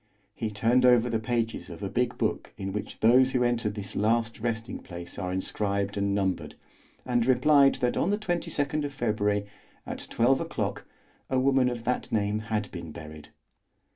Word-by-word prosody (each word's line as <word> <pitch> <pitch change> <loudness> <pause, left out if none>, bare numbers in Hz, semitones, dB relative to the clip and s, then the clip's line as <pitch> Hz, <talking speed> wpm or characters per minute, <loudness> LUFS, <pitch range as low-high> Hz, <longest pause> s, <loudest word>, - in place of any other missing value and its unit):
He 110 - -3
turned 115 +5 +2
over 125 -1 +5
the 115 - +1
pages 115 0 -2
of - - -8
a - - -1
big - - -1
book - - -2
in 95 0 -4
which 105 - -5
those 130 +4 +5
who 125 -1 +2
enter 120 -3 +1
this 105 -1 -6
last 115 +2 +1
resting 115 0 -3
place 85 -1 -8
are 90 - -2
inscribed 100 +1 -1
and 100 0 0
numbered, 95 -2 -1 0.5
and 120 -2 +2
replied 135 +2 +5
that 125 -1 +1
on - - +1
the 205 - +2
22nd 160 -7 -1
of 140 -1 -5
February, 105 -4 0 0.4
at - - -5
12 130 +3 +3
o'clock, - - -3 0.4
a 130 - +1
woman 130 -1 +3
of 120 -2 -5
that 125 +1 -2
name 105 0 +1
had 105 -1 -1
been 85 -3 -7
buried. 75 0 -10
115 Hz, 175 wpm, -28 LUFS, 100-125 Hz, 0.5 s, over